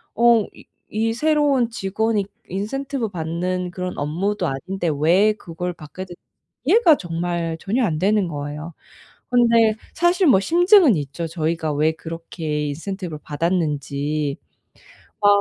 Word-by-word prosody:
어 235 -2 +5
이 - - -15 0.3
이 225 +1 0
새로운 290 -2 +2
직원이 215 0 -1 0.2
인센티브 245 +5 -3
받는 180 +1 -2
그런 180 0 -4
업무도 180 +6 -1
아닌데 170 +6 -3
왜 180 +8 +4
그걸 180 -3 -5
받게 170 +3 -9
됐 175 - -11 0.5
이해가 335 - +5
정말 170 -1 -3
전혀 235 +8 0
안 155 -6 -1
되는 200 0 +2
거예요. 150 +1 -6 0.6
근데 230 -3 +4 0.2
사실 345 +2 +3
뭐 225 -9 +6
심증은 345 - +5
있죠. 150 +3 -4
저희가 160 -1 -2
왜 155 +2 +2
그렇게 160 -2 -4
인센티브를 170 +1 -5
받았는지. 150 -3 -1 0.9
아 - - +4
180 Hz, 270 characters per minute, -22 LUFS, 160-225 Hz, 0.9 s, 뭐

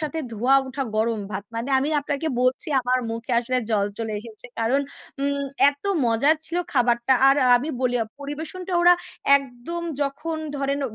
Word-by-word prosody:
সাথে 310 +1 -3
ধোঁয়া 245 +5 +3
ওঠা 265 +1 -4
গরম 220 0 0
ভাত। 200 0 -4
মানে 230 +3 -3
আমি 280 +3 -1
আপনাকে 285 +2 -3
বলছি 255 +5 +1
আমার 255 +1 +1
মুখে 230 +2 -4
আসলে 255 +1 -1
জল 205 -2 +2
চলে 225 -1 -3
এসেছে। 220 -1 -11
কারণ 240 +5 +2 0.4
উম 280 0 -1 0.2
এত 285 0 -17 0.2
মজার 240 +7 +3
ছিল 335 - -2 0.2
খাবারটা। 240 -1 +2 0.2
আর 275 - +5 0.2
আমি 260 +6 -3
বলি 245 -1 +1
আ - - -3 0.2
পরিবেশনটা 315 +6 -6
ওরা 350 +1 +7 0.4
একদম 275 +5 -6 0.2
যখন 305 +4 -3 0.2
ধরেন, 280 0 -1
265 Hz, 165 wpm, -23 LUFS, 235-285 Hz, 0.4 s, ওরা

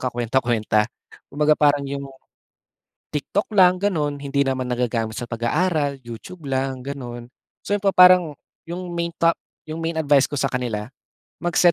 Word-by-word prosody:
kakuwenta-kuwenta. 120 -3 0 0.4
Kumbaga 150 +2 +2
parang 145 -1 +3
'yong 140 0 -5 1.0
TikTok 150 +7 -2
lang 185 -1 +6
ganun, 155 -8 0
hindi 140 0 0
naman 130 -1 -1
nagagamit 115 -3 -1
sa 120 - -3
pag-aaral, 140 +5 0
YouTube 120 +8 -10
lang, 130 -1 -1
ganun. 120 -4 -7 0.4
So, - - -1
pa 200 - +3
parang 180 -3 +7 0.4
yung 180 +1 -5
main 170 0 -1
ta 165 0 +4 0.4
main 165 +1 -3
advice 145 -3 +4
ko - - -11
sa 135 - +1
kanila 120 -4 -3 0.5
mag-set 175 0 +3
140 Hz, 140 wpm, -22 LUFS, 125-165 Hz, 1.0 s, parang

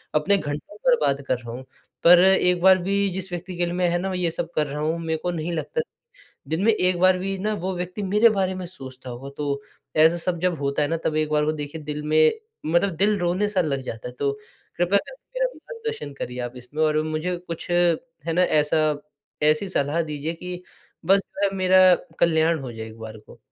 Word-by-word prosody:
अपने 195 +7 +4
घंटों 150 +3 -5
बर्बाद 145 - +3
कर 130 - +1
रहा 120 -1 -9
हूँ। 130 +2 -7 0.4
पर 175 +1 +8
एक 180 -1 +4
बार 190 0 +7
भी 200 +2 0 0.2
जिस 190 0 -5
व्यक्ति 175 +1 -5
के 175 - +2
लिए 175 - -3
मैं 180 0 +1
है 175 - +1
ना 190 +1 -2
ये 175 -2 0
सब 165 +1 -4
कर 150 -1 +1
रहा 145 +2 -5
हूँ 160 +2 0
मेरे 160 0 0
को 180 - 0
नहीं 170 0 -3
लगता 470 - -2 0.7
दिन 160 +4 -1
में 225 - +5
एक 180 -3 +2
बार 185 0 +5
भी 195 +1 -3
ना 215 +3 -1
वो 190 0 -1
व्यक्ति 180 +4 -4
मेरे 210 +4 +4
बारे 190 -2 0
में 185 - -5
सोचता 130 -7 -10
होगा 130 +3 -8
तो 140 -1 -2 0.4
ऐसा 170 +1 +2
सब 170 0 -2
जब 180 -4 0
होता 140 +1 0
है 145 - +1
ना 165 - 0
तब 155 - 0
एक 155 0 0
बार 150 0 +2
को 155 - +1
देखिए 150 +2 -7
दिल 150 0 -4
में, 155 +1 +4 0.3
मतलब 170 +5 +2
दिल 205 +3 +3
रोने-सा 185 +3 0
लग 140 -5 -1
जाता 115 -1 -6
है। 125 - -10
तो 140 -1 +1 0.4
कृपया 175 +3 +3
करके - - -11
मेरा - - +4
मार्गदर्शन 455 - -6
करिए 125 +1 -5
आप 120 +1 -5
इसमें 125 +6 -4
और 155 0 +2
मुझे 155 +3 -2
कुछ 175 0 -7
है 170 -2 0
ना, 180 +2 +3
ऐसा 155 -2 +2 0.5
ऐसी 155 +6 +3
सलाह 160 0 0
दीजिए 150 0 -4
कि 180 +1 -7 0.4
बस 195 +1 +5
जो 200 - -3
है 195 -1 0
मेरा 185 0 +6 0.3
कल्याण 165 -1 +3
हो 130 -3 -6
जाए 110 -1 -7
एक 110 0 -12
बार 110 0 -8
को। - - -15
170 Hz, 220 wpm, -24 LUFS, 150-185 Hz, 0.7 s, पर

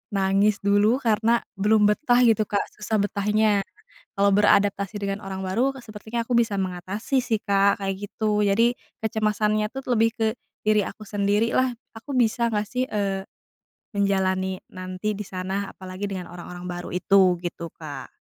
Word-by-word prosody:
nangis 195 +2 +3
dulu 205 +4 +4
karena 230 +1 +2 0.2
belum 210 +2 +4
betah 245 +2 +3
gitu, 220 -2 +3
Kak, 205 - 0 0.2
susah 215 +1 -1
betahnya. 210 0 +2 0.6
Kalau 200 0 +4
beradaptasi 200 0 +3
dengan 200 0 -2
orang 190 0 -5
baru 245 +9 0
sepertinya 220 +1 -5
aku 250 - -1
bisa 230 -3 +2
mengatasi 190 +7 -2
sih, 230 -3 0
Kak, 200 0 +3
kayak 195 0 -1
gitu, 210 -2 0
jadi 230 +5 +3 0.3
kecemasannya 215 -1 +1
tuh 270 - -4
lebih 225 -1 +3
ke 225 - 0 0.4
diri 215 0 +4
aku 215 - -9
sendirilah, 210 +5 +1 0.2
"Aku 275 +5 -7
bisa 235 0 +2
nggak 210 -1 -1
sih, 250 +3 -1
eee, 195 -3 -1 0.7
menjalani 190 -2 +1
nanti 185 +3 -4
di 210 - -4
sana 190 +2 -4
apalagi 185 +1 -6
dengan 185 -3 -5
orang-orang 175 0 -9
baru 175 0 -5
itu," 185 -1 +4
gitu, 170 -1 -5
Kak. 155 -3 -8
205 Hz, 150 wpm, -24 LUFS, 195-220 Hz, 0.7 s, dulu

